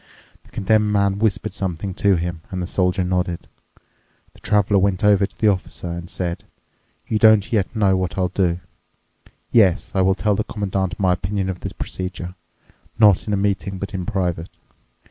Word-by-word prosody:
The -, -, -20 dB
Condemned 105 Hz, +1 st, +1 dB
Man 100 Hz, -1 st, +1 dB
whispered 105 Hz, -3 st, 0 dB
something 95 Hz, 0 st, -3 dB
to 100 Hz, +1 st, +2 dB
him, 85 Hz, -1 st, -3 dB
and 95 Hz, -, -4 dB
the 90 Hz, -, -2 dB
Soldier 90 Hz, +1 st, 0 dB
nodded. 90 Hz, -1 st, -2 dB, 0.9 s
The -, -, -19 dB
Traveler 105 Hz, -1 st, +2 dB
went 95 Hz, 0 st, +1 dB
over 100 Hz, -1 st, +4 dB
to -, -, -21 dB
the 110 Hz, -, +3 dB
Officer 95 Hz, -3 st, -1 dB
and 85 Hz, +1 st, -6 dB
said, 85 Hz, -3 st, -3 dB, 0.6 s
"You 110 Hz, -, 0 dB
don't 110 Hz, -1 st, +5 dB
yet 105 Hz, +1 st, 0 dB
know 100 Hz, -3 st, +3 dB
what 95 Hz, -1 st, -2 dB
I'll 90 Hz, -1 st, +1 dB
do. 90 Hz, -3 st, 0 dB, 0.9 s
Yes, 100 Hz, -7 st, +3 dB
I 95 Hz, -, +2 dB
will 95 Hz, 0 st, +3 dB
tell 105 Hz, +1 st, +1 dB
the 105 Hz, +2 st, 0 dB
Commandant 95 Hz, -4 st, -3 dB
my 95 Hz, -2 st, +3 dB
opinion 95 Hz, +2 st, -2 dB
of 90 Hz, -, -8 dB
the -, -, -5 dB
procedure—not 95 Hz, +3 st, -2 dB
in 105 Hz, -, -1 dB
a -, -, +2 dB
meeting, 100 Hz, -1 st, -1 dB
but 100 Hz, +2 st, -6 dB
in 90 Hz, -2 st, -4 dB
private. 90 Hz, -5 st, -2 dB
95 Hz, 175 wpm, -21 LUFS, 90-100 Hz, 0.9 s, don't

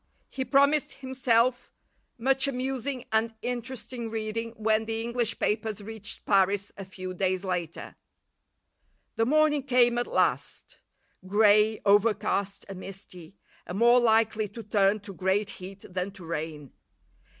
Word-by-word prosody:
He 265 Hz, -, -2 dB
promised 280 Hz, +3 st, +3 dB
himself 255 Hz, -2 st, +1 dB, 0.5 s
much 265 Hz, +3 st, +2 dB
amusing 260 Hz, -1 st, -3 dB
and 225 Hz, +1 st, +1 dB
interesting 245 Hz, -1 st, -4 dB
reading 225 Hz, +1 st, -3 dB
when 220 Hz, 0 st, +1 dB
the 225 Hz, 0 st, -2 dB
English 235 Hz, 0 st, -1 dB
papers 215 Hz, 0 st, -1 dB
reached 215 Hz, 0 st, -6 dB
Paris 200 Hz, 0 st, +2 dB
a 195 Hz, -, -8 dB
few 185 Hz, 0 st, -7 dB
days 185 Hz, +1 st, -1 dB
later. 175 Hz, -3 st, -4 dB, 1.2 s
The 225 Hz, 0 st, +1 dB
morning 305 Hz, 0 st, +3 dB
came 245 Hz, -3 st, +3 dB
at 240 Hz, -, -2 dB
last; -, -, -1 dB, 0.5 s
grey, 210 Hz, +2 st, +4 dB
overcast, 205 Hz, -1 st, +2 dB
and 195 Hz, -2 st, -8 dB
misty, 190 Hz, -2 st, -8 dB, 0.3 s
and 180 Hz, -, -4 dB
more 240 Hz, +2 st, +6 dB
likely 220 Hz, -2 st, +2 dB
to 225 Hz, +3 st, -9 dB
turn 205 Hz, 0 st, +2 dB
to 200 Hz, -1 st, -8 dB
great 195 Hz, +2 st, 0 dB
heat 195 Hz, +2 st, -9 dB
than 180 Hz, +1 st, -3 dB
to 185 Hz, -4 st, -9 dB
rain. 155 Hz, -3 st, -5 dB
220 Hz, 130 wpm, -27 LUFS, 195-240 Hz, 1.2 s, more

